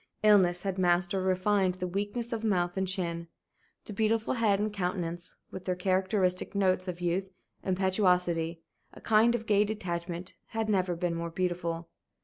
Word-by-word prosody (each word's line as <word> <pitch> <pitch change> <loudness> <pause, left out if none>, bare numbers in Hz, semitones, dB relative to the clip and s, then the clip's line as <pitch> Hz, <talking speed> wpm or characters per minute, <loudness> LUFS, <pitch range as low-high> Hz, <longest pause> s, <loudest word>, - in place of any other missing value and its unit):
Illness 185 -4 +5
had 195 -1 -2
masked 175 +1 +2
or 190 - 0
refined 185 0 +2
the 185 0 -4
weakness 205 +6 -2
of 225 -1 -3
mouth 175 -5 +1
and 190 0 0
chin; 170 -3 -1 0.6
the 210 - -7
beautiful 220 +2 +1
head 220 -5 +2
and 210 0 -1
countenance, 180 -3 -3 0.2
with 185 - -8
their 185 - 0
characteristic 185 +1 0
notes 185 -1 +2
of 180 -1 -5
youth, 180 +2 0 0.3
impetuosity, 180 -3 +1 0.3
a - - -12
kind 225 +2 +4
of 225 -1 -4
gay 205 -1 +4
detachment, 180 -4 -4
had 220 -1 -2
never 185 -3 +1
been 175 0 -1
more 170 0 -3
beautiful. 170 -1 -2
185 Hz, 160 wpm, -29 LUFS, 175-205 Hz, 0.6 s, Illness